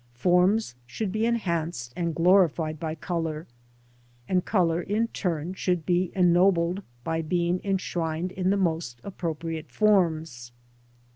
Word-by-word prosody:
Forms 180 - +2
should 200 - -3
be 215 +3 0
enhanced 170 - -2
and 170 -2 -2
glorified 165 -3 +3
by 160 0 -3
colour, 165 -1 -3 0.8
and 180 -1 +1
colour 175 -4 +1
in 215 +5 -1
turn 175 -4 -2
should 180 -3 -1
be 180 0 +1
ennobled 180 0 +3 0.2
by 165 +2 -1
being 175 +2 0
enshrined 175 -3 -2
in 185 0 -1
the 200 - +2
most 160 -10 -1
appropriate 165 -4 -5
forms. 160 - +1
175 Hz, 125 wpm, -26 LUFS, 160-185 Hz, 0.8 s, glorified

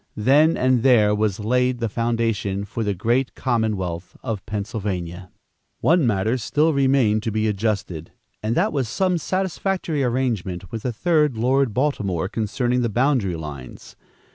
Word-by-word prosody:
Then 145 +9 +4
and 130 -1 +2
there 110 -5 +4
was 105 -1 0
laid 125 +3 +1
the 115 -1 -1
foundation 115 -3 -1
for 115 +3 -4
the 100 -2 -1
great 120 +8 0
commonwealth 105 -8 -2
of 110 -6 -3
Pennsylvania. 95 -4 -4 0.5
One 165 -5 +3
matter 110 +4 +1
still 150 +7 +1
remained 130 -6 +3
to 110 - -2
be 110 +1 0
adjusted, 100 -6 -2 0.3
and 110 +2 -1
that 210 +5 +2
was 135 -6 -1
some 180 +7 +1
satisfactory 185 -4 -1
arrangement 115 -8 -2
with 115 - -4
the 125 - -2
third 150 0 +1
Lord 130 +2 +2
Baltimore, 105 - 0
concerning 120 +4 -1
the 120 - 0
boundary 120 -5 +1
lines. 75 -5 -9
115 Hz, 145 wpm, -22 LUFS, 100-130 Hz, 0.5 s, Then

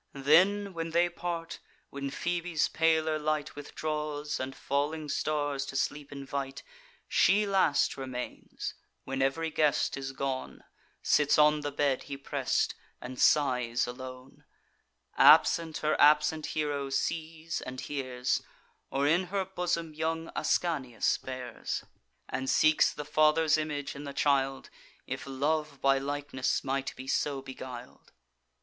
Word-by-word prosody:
Then, 190 +8 +4
when 165 -1 -3
they 170 +2 +3
part, 170 -1 -5 0.3
when 140 0 -4
Phoebe's 175 +2 -1
paler 160 -1 +2
light 155 -1 -1
Withdraws, 150 0 -3
and 130 +1 -4
falling 150 +3 -2
stars 145 -1 -1
to 135 - -7
sleep 145 +1 -2
invite, 140 -1 -5 0.4
She 210 +2 +4
last 190 -7 +2
remains, 130 -2 -6 0.3
when 135 0 -3
ev'ry 160 +5 0
guest 150 -2 +2
is 135 -1 -4
gone, 135 -1 -4 0.4
Sits 150 -1 +3
on 150 0 +5
the 145 0 -3
bed 140 -2 0
he 140 - -4
press'd, 140 - 0 0.3
and 125 0 -6
sighs 125 -5 +3
alone; 130 +1 -9 0.7
Absent, 165 -2 +6
her 155 - +3
absent 150 +1 +4
hero 145 -2 -2
sees 160 +3 -2
and 130 0 -6
hears; 130 -3 -2 0.5
Or 140 +1 0
in 165 +5 +3
her 190 +1 -2
bosom 175 -3 -2
young 160 +1 -2
Ascanius 135 -9 0
bears, 130 -2 -5 0.4
And 130 0 -3
seeks 155 0 +4
the 150 - -7
father's 155 +1 +4
image 150 -3 -3
in 145 +1 -7
the 140 - -6
child, 135 -2 +1 0.3
If - - -5
love 145 +1 -1
by 135 0 +3
likeness 140 -2 -2
might 135 0 -2
be 130 - -9
so 140 0 0
beguil'd. 130 -2 -9
145 Hz, 130 wpm, -30 LUFS, 135-160 Hz, 0.7 s, Absent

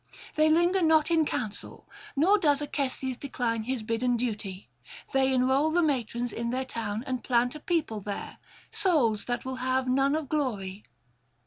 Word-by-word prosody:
They 310 0 +4
linger 345 +4 +3
not 315 -1 +4
in 320 -2 +3
counsel, 215 -4 -5 0.3
nor 375 +9 +4
does 290 -5 +3
Acestes 270 -3 -2
decline 235 -5 -2
his 255 -2 -2
bidden 235 +2 0
duty: 210 -5 -4 0.5
they 270 0 +3
enrol 265 +4 +3
the 345 +2 +2
matrons 245 -5 -1
in 235 0 -3
their 260 +2 -1
town, 220 -3 -4
and 255 -2 -3
plant 245 0 +2
a 305 - -8
people 300 - -1
there, 200 +1 -6 0.3
souls 250 - +2
that 245 +1 -3
will 260 0 -4
have 255 0 0
none 270 +3 +2
of 310 -2 -2
glory. 210 -10 -2
255 Hz, 160 wpm, -28 LUFS, 235-300 Hz, 0.5 s, They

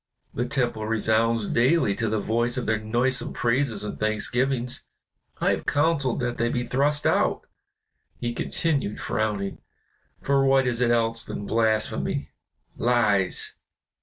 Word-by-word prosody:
The 120 +1 -2
temple 120 -4 -1
resounds 115 0 +1
daily 120 -3 +2
to 115 -2 0
the 110 0 0
voice 120 +4 -1
of 125 - -2
their 110 0 +1
noisome 120 +4 0
praises 120 -3 0
and 105 - -6
thanksgivings. 120 +3 0 0.6
I - - +2
have - - -3
counseled 145 -4 +1
that 120 -1 -2
they 120 0 +1
be 120 0 -1
thrust 140 +5 +1
out," - - +2 0.8
he 120 0 -2
continued 140 -4 -1
frowning, 105 -2 -2 0.6
"for 140 0 +2
what 135 -1 +4
is 125 -1 -1
it 120 - +3
else 115 -1 +1
than 100 - -6
blasphemy 110 -10 0 0.4
lies. 110 -6 +2
120 Hz, 135 wpm, -25 LUFS, 110-125 Hz, 0.8 s, what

